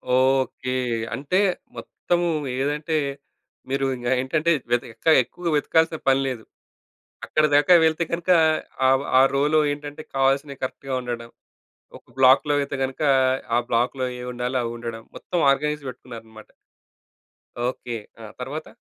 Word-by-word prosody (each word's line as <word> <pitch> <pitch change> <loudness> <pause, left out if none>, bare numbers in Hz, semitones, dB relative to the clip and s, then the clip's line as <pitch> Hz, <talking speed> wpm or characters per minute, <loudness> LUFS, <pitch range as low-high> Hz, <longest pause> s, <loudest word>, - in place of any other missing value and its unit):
Okay. 130 0 +1 0.4
అంటే 140 +8 -1 0.4
మొత్తము 175 0 -2 0.3
ఏదంటే, 150 +3 -1 0.7
మీరు 135 0 0
ఇంక 120 -1 -6
ఏంటంటే 155 +5 0 0.2
వెత 120 +1 +2
ఇంకా 160 +8 +2
ఎక్కువగా 170 +8 -5
వెతకాల్సిన 160 +2 +2
పని 135 0 +4
లేదు. 125 -4 -4 0.8
అక్కడి 155 0 +2
దాకా 145 +5 +5
వెళితే 160 +1 +2
గనుక 170 +2 -1 0.6
ఆ! - - +5 0.3
ఆ! - - +7
రోలో 150 +3 +3
ఏంటంటే, 145 +1 -7
కావాల్సినవి 135 +1 0
కరెక్ట్‌గా 130 +1 -5
ఉండడం. 120 -1 -5 0.7
ఒక - - -23
బ్లాక్‌లో 135 +3 +5
అయితే 140 0 -4
గనుక 130 +2 -4 0.5
ఆ! - - +4
బ్లాక్‌లో 125 +3 0
ఏ - - -6
ఉండాలో 125 +1 -2
అవి 115 0 -4
ఉండడం. 115 -1 -7
మొత్తం 175 - -3
ఆర్గనైజ్ 150 +1 -1
పెట్టుకున్నారన్నమాట. 115 -3 -12 1.2
ఓకే. 125 -2 -4 0.2
ఆ! - - -9 0.2
తరువాత? 140 +5 -6
135 Hz, 125 wpm, -23 LUFS, 125-150 Hz, 1.2 s, ఆ